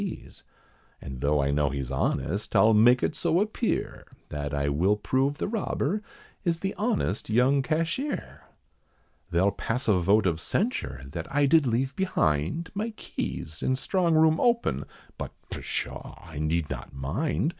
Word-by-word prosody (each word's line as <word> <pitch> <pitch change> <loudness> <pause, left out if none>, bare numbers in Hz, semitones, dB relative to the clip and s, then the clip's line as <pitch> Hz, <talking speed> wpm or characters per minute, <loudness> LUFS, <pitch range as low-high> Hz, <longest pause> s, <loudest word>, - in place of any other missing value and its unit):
P.'s; 195 - -7 0.6
And 65 -2 -8
though 75 +1 +2
I 70 0 +2
know 75 0 +2
he's 70 -2 -4
honest, 85 +8 -1
I'll 110 +1 +6
make 120 +4 +6
it 155 - 0
so 165 +3 +2
appear, 215 +3 -1 0.2
That 75 -1 -4
I 70 0 0
will 85 +9 +2
prove 135 +7 0
the - - -2
robber, 205 -3 -1 0.4
is 170 -2 0
the 195 0 -1
honest 210 - -1
young 125 +5 +4
cashier. 165 - -2 0.9
They'll 90 +3 +3
pass 115 +5 -3
a 105 - +5
vote 100 +4 +3
of 85 -3 0
censure, 190 - -1
that 85 +2 -5
I 145 0 +3
did 145 0 +4
leave 130 +4 0
behind, 125 - 0
My 215 +3 -2
keys, 75 +1 -5
and 130 - +1
strong 170 +4 +1
room 160 0 +5
open, 235 -1 +2 0.3
but, - - -5 0.2
pshaw! - - -4
I 80 -3 -9
need 80 +1 0
not - - -6
mind. 95 - -1
120 Hz, 155 wpm, -27 LUFS, -, 0.9 s, I'll